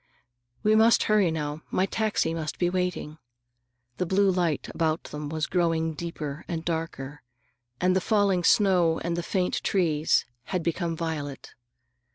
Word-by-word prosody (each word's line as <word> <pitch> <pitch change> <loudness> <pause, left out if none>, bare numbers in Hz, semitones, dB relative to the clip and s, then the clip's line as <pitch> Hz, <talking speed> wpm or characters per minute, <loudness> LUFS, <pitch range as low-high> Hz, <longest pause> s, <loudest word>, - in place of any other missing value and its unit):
—We 215 - +4
must 225 +1 +5
hurry 210 -4 +3
now. 150 -1 -3
My 185 - +1
taxi 210 -5 0
must 160 -2 -4
be 175 -1 +1
waiting." 180 -4 -2 0.8
The 180 - -1
blue 195 +2 +3
light 175 -5 0
about 160 0 0
them 150 0 -6
was 155 0 -1
growing 165 -2 0
deeper 155 -2 -5
and 165 -2 -4
darker, 160 -4 -4 0.6
and 185 0 +2
the 190 - +2
falling 200 -3 +2
snow 180 -5 +4
and 170 0 -1
the 175 - -1
faint 180 +1 -1
trees 160 -5 +2 0.2
had 180 -3 -2
become 170 0 -1
violet. 150 -4 -5
170 Hz, 150 wpm, -26 LUFS, 160-185 Hz, 0.8 s, must